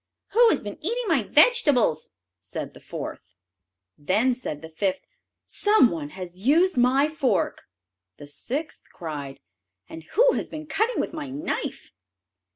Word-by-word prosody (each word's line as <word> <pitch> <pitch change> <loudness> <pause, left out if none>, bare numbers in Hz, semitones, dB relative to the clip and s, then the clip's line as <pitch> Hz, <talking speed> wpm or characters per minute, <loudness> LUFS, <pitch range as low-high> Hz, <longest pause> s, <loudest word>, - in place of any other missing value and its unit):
"Who 470 +1 +5
has - - +2
been 205 +4 -8
eating 470 +8 -1
my 320 -8 +3
vegetables?" 285 - +3 0.3
said - - -7
the - - -14
fourth. - - -8 0.6
Then 210 - +2
said 165 - -6
the 160 - -8
fifth, 190 +3 -1 0.4
"Some 415 - +4
one 155 -4 -4
has 180 -1 -8
used 320 - +3
my 255 +4 +4
fork." 300 -4 -1 0.5
The 145 - -10
sixth 265 - -4
cried, 145 -5 -7 0.5
"And 160 - -9
who - - +5
has - - -3
been 310 0 -7
cutting 440 +10 0
with - - -2
my 300 -4 -5
knife?" 290 +5 -4
255 Hz, 145 wpm, -25 LUFS, -, 0.6 s, Who